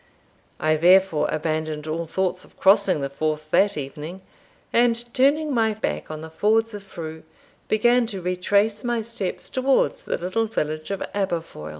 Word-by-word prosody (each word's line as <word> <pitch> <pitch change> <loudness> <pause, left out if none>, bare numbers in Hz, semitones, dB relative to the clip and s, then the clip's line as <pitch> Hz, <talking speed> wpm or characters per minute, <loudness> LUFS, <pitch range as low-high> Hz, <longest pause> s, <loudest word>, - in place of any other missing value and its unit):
I 155 0 +2
therefore 175 -2 +4
abandoned 155 -1 -2
all 160 +1 -3
thoughts 185 +1 -1
of - - -21
crossing 195 -5 +4
the 140 - -2
Forth 155 +1 -3
that 200 -2 +3
evening; 150 +6 -6 0.5
and, 235 0 +4 0.2
turning 290 +3 +3
my 220 -3 +2
back 220 - -3
on 155 0 -6
the 160 0 -9
Fords 225 +5 +2
of 205 - -6
Frew, 160 -4 -8 0.5
began 240 +2 +3
to 200 -4 -5
retrace 200 +4 +1
my 240 -2 -1
steps 220 -4 -4
towards 275 - +1
the - - -1
little 185 +6 -1
village 155 -6 -3
of 195 -1 -2
Aberfoil. 170 - -3
190 Hz, 160 wpm, -23 LUFS, 155-225 Hz, 0.5 s, therefore